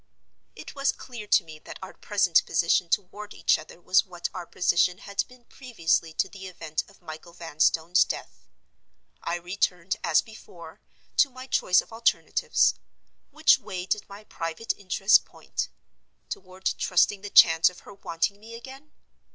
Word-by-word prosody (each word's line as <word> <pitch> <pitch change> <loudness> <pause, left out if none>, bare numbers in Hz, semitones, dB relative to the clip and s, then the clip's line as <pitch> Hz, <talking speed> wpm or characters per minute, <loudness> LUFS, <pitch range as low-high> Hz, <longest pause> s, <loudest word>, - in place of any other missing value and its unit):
It - - -10
was 275 0 +1
clear 235 -5 -10
to - - +4
me 155 -1 -12
that - - -10
our 190 - -9
present 195 -5 +2
position 170 +1 +2
toward 205 +3 -3
each 165 - +2
other 155 +2 -13
was 185 +2 +3
what 175 -3 -5
our 175 - -7
position 180 0 +2
had 200 +1 -3
been 250 -1 -19
previously 170 -12 -1
to 175 - 0
the 190 0 -10
event 165 -4 -4
of 200 -2 -22
Michael 160 +1 -10
Vanstone's 165 +1 +2
death. - - -7 0.7
I - - -2
returned, 180 0 -2
as 165 -2 +3
before, 200 -6 -13 0.4
to 285 - +5
my 255 0 -10
choice 185 -8 +3
of - - -17
alternatives. 230 +1 +2 0.6
Which 305 -1 +4
way 185 -7 -6
did 205 +2 -2
my 200 +2 -11
private 165 +3 -4
interests 195 +1 +4
point? - - -6 0.6
Toward 185 0 -9
trusting 190 +2 +2
the 205 - -7
chance 165 -3 +7
of 180 - -15
her 205 - -13
wanting 195 +1 -2
me 225 +2 -11
again? 265 +5 -12
185 Hz, 160 wpm, -26 LUFS, 170-210 Hz, 0.7 s, chance